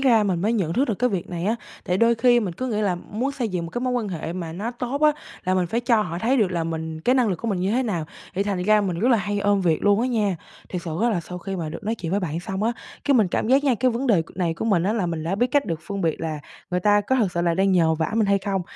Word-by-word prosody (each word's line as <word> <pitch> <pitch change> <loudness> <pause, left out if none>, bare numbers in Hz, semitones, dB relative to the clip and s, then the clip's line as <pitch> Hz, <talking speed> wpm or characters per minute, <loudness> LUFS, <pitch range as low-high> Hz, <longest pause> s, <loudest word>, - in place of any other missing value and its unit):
ra 235 -5 +4
mình 185 -4 0
mới 215 +4 +1
nhận 185 -8 0
thức 265 +8 +2
được 220 - +1
cái 250 0 +2
việc 190 -1 -3
này 175 0 -3
á, 220 +3 +1 0.3
tại 180 0 0
đôi 230 0 +4
khi 240 +1 +4
mình 185 -6 -3
cứ 255 - -3
nghĩ 215 -3 -1
là 195 -4 +1
muốn 235 +10 -3
xây 245 -5 -2
dựng 180 -3 -3
một - - -9
cái 240 - -3
mối 255 0 0
quan 235 -4 -1
hệ 165 -2 -4
mà 170 -3 -5
nó 205 +8 -3
tốt 250 +4 -4
á, 300 0 +6 0.3
là 185 +1 +1
mình 180 -2 +1
phải 230 +6 -1
cho 235 -3 +3
họ 175 -3 -4
thấy 245 +7 +2
được 210 -6 +2
là 170 -2 -1
mình 160 -1 -4
cái 250 +10 +2
năng 250 -4 +3
lực 185 - 0
của 230 - -4
mình 190 -4 -1
như 190 +2 0
thế 255 +3 +2
nào, 180 -9 -2 0.3
thì 195 - +1
thành 195 -3 -2
ra 215 +2 +4
mình 180 -4 -2
rất 245 - +3
là 235 - +6
hay 205 0 -2
ôm 200 0 +2
việc 165 -4 +1
luôn 205 +1 +4
á 245 - +1
nha. 210 -7 +1 0.3
Thiệt 180 -1 -4
sự 165 -2 -4
á, 235 - +3
là 180 -5 0
sau 180 +2 -8
khi 195 +2 -5
mà 165 -3 -3
được 205 +7 -7
nói 220 +2 0
chuyện 170 -6 -5
với 200 +2 +1
bạn 165 -1 -3
xong 190 +2 -4
á, 230 +2 +2 0.3
cái 285 - +3
mình 215 -7 +4
cảm 215 - -1
giác 270 +2 +4
nha, 265 -4 +3
cái 255 +3 +2
vấn 245 +4 -2
đề 195 -9 +4
c 165 - -18
này 170 -3 0
của - - -4
mình 195 -7 +2
á, 200 +4 +1
là 205 -6 0
mình 165 -2 -3
đã 180 +4 -1
biết 245 +5 +2
cách 285 +3 +1
được 165 -1 -3
phân 200 -1 -4
biệt 165 -4 0
là 155 -2 -3 0.3
người 180 0 0
ta 205 +2 +4
có 260 +6 0
thực 205 -7 +1
sự 170 - -1
là 170 -1 +2
đang 195 +1 +2
nhờ 165 -3 +4
vả 160 +3 -1
mình 225 -2 +2
hay 200 0 +3
không. 195 -1 -2
200 Hz, 340 wpm, -23 LUFS, 175-230 Hz, 0.3 s, á